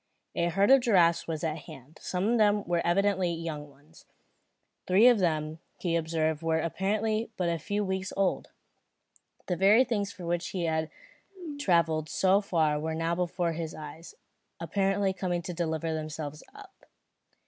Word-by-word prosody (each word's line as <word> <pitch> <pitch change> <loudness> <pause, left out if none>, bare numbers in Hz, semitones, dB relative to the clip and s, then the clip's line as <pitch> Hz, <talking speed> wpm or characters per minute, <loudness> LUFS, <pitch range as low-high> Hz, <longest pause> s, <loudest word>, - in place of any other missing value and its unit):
A 170 - 0
herd 195 +6 +3
of 270 -1 +7
giraffes 175 -8 +3
was 160 -1 -4
at 160 0 -2
hand. 150 -2 -13
Some 185 +2 -1
of 240 - +3
them 205 -1 +3
were 175 -2 0
evidently 190 0 +2
young 160 -3 -5
ones. 145 +4 -21 0.8
Three 195 +6 +6
of 240 -4 +6
them 155 -3 -1 0.2
he 170 -2 -1
observed 160 -1 0
were 165 -1 +1
apparently 215 +6 -1
but 180 -2 0
a 170 -1 -1
few 205 +6 -2
weeks 190 0 -3
old. 195 -1 0 1.0
The 180 - -1
very 200 +7 +5
things 205 -6 -2
for 180 -4 -9
which 175 +1 -1
he 180 -3 -3
had 160 -1 -1 0.7
travelled 165 - +2
so 195 +1 +3
far 160 -6 +1
were 160 +1 -3
now 165 +1 -1
before 175 0 -1
his 160 0 -5
eyes, 160 +2 -10 0.4
apparently 195 +3 0
coming 180 -2 -2
to 180 - -5
deliver 160 -1 -2
themselves 155 -1 -5
up. 405 -2 -15
170 Hz, 160 wpm, -29 LUFS, 160-195 Hz, 1.0 s, of